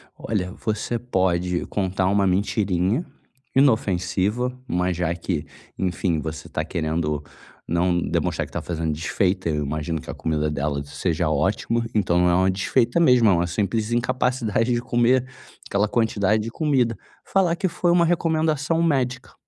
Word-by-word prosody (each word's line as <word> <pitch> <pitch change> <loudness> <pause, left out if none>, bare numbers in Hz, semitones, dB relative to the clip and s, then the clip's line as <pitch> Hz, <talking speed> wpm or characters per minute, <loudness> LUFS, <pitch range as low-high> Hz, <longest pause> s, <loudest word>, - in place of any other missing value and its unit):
Olha, 95 -4 -3
você 110 +3 -2
pode 90 -6 0
contar 95 -1 -1
uma 100 +1 +2
mentirinha, 100 - +1 0.5
inofensiva, 110 -1 +1
mas 90 0 0
já 85 -1 0
que, 85 -2 -3 0.3
enfim, 90 -2 0
você 80 +1 -6
tá - - -3
querendo 80 -2 -2 0.4
não 85 +1 +1
demonstrar - - -1
que - - -17
tá - - -2
fazendo 80 -2 -2
desfeita, 90 +3 0
eu 75 -1 0
imagino 75 +3 -2
que - - -12
a - - -3
comida 75 -1 -1
dela 70 -1 -2
seja 75 +3 -1
ótima, 110 +7 0
então 95 -5 +2
não 90 0 +4
é - - +3
uma 95 +1 +3
desfeita 120 - +1
mesmo 125 -8 +5
é - - +5
uma 85 0 +1
simples 105 +5 -1
incapacidade 125 -1 0
de 120 - 0
comer 120 +2 +2 0.4
aquela 100 +1 +1
quantidade 110 -2 +1
de 115 - -4
comida. 130 -5 +1 0.3
Falar 180 -3 +2
que 190 +1 0
foi 175 0 0
uma 170 -1 +4
recomendação 160 -1 +1
médica, 130 -5 0
100 Hz, 155 wpm, -23 LUFS, 85-125 Hz, 0.5 s, mesmo